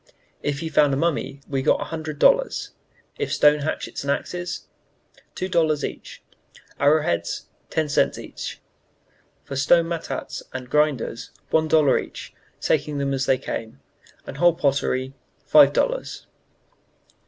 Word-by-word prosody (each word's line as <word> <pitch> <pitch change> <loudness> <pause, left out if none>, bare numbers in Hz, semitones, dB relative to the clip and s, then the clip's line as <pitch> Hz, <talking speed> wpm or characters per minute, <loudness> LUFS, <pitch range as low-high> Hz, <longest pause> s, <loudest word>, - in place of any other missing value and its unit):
If 145 0 -2
he 165 - -3
found 145 -3 +3
a - - -2
mummy 145 -3 -1
we 135 -2 -1
got - - +3
one - - -5
hundred 155 -2 -5
dollars; - - +3 0.5
if 435 - -2
stone 150 0 +5
hatchets 150 -1 -4
and 140 - -4
axes, 175 +5 -3 0.7
two 185 - -2
dollars 160 -5 +1
each; - - -8 0.6
arrow 150 +2 +4
heads, 85 - -2 0.2
ten 160 -1 0
cents 145 - +1
each; - - -7 0.8
for 140 - -7
stone 165 +5 +4
matats 165 -5 -4
and 130 -1 -7
grinders, 150 -6 0 0.2
one 160 0 +3
dollar 155 -3 +4
each, - - -9 0.3
taking 150 -1 0
them 140 -1 -1
as 135 -1 -1
they 130 - +4
came; 110 - -6 0.5
and 135 - -8
whole 175 +1 +4
pottery, 135 -4 0 0.3
five - - +7
dollars." - - -1
150 Hz, 140 wpm, -23 LUFS, 135-165 Hz, 0.8 s, five